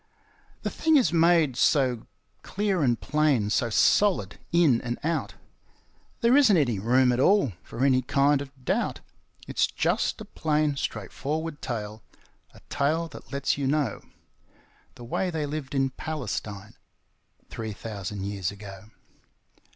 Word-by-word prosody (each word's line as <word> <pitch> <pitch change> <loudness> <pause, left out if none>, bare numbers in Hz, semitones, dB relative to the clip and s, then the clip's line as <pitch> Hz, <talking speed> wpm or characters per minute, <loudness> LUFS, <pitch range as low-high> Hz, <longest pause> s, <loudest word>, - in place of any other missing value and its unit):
The - - -2
thing 320 0 +2
is 250 -10 +2
made 165 -5 +4
so 125 -2 +2 0.3
clear 200 -3 -1
and 120 -5 +2
plain, 145 -9 +1
so 120 +1 +1
solid 115 - +2
in 160 -9 +4
and 120 -1 -4
out, 165 +1 -2 0.9
There 235 +2 +4
isn't 250 -10 +6
any 120 -10 +1
room 125 +4 +3
at 125 - 0
all 190 - +3
for 130 - -3
any 130 -2 +4
kind 140 +3 +2
of 135 -2 -11
doubt. - - -1 0.5
It's - - +1
just - - -1
a - - -8
plain 150 -2 0
straightforward 145 +7 -4
tale 110 -3 -5 0.5
a - - -18
tale 160 +4 0
that - - -13
lets 140 0 -1
you 135 - 0
know 140 -6 0 0.9
The 120 - -11
way 180 +10 -1
they 160 -3 -2
lived 145 -1 -5
in 135 -1 +1
Palestine 110 -9 -5 0.8
three 110 -1 -5
thousand 100 -2 -6
years 100 -2 -2
ago. 100 -1 -10
135 Hz, 140 wpm, -26 LUFS, 115-155 Hz, 0.9 s, isn't